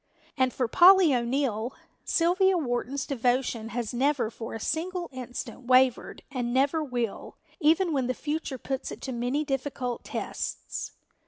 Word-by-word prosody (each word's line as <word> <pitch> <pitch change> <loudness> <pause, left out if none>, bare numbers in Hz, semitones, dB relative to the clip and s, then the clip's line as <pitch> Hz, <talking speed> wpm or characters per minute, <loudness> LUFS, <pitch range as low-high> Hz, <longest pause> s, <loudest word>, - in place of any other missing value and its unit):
And 260 -2 +2
for 250 -1 -1
Polly 360 - +7
O'Neill, 240 -2 -1 0.3
Sylvia 370 +3 +3
Wharton's 260 -1 -2
devotion 245 -3 0
has 235 -1 -3
never 255 -2 +1
for 225 0 -7
a - - -5
single 350 +7 -2
instant 250 0 -7
wavered 255 -1 +3
and 245 -3 -2
never 280 +5 +2
will, 245 -6 -4 0.2
even 330 +2 +3
when 265 -3 0
the 255 - -1
future 300 -3 -3
puts 265 +1 -4
it - - -7
to 265 - -4
many 250 +5 -1
difficult 270 -3 -3
tests. - - -5
260 Hz, 145 wpm, -27 LUFS, 245-300 Hz, 0.3 s, Polly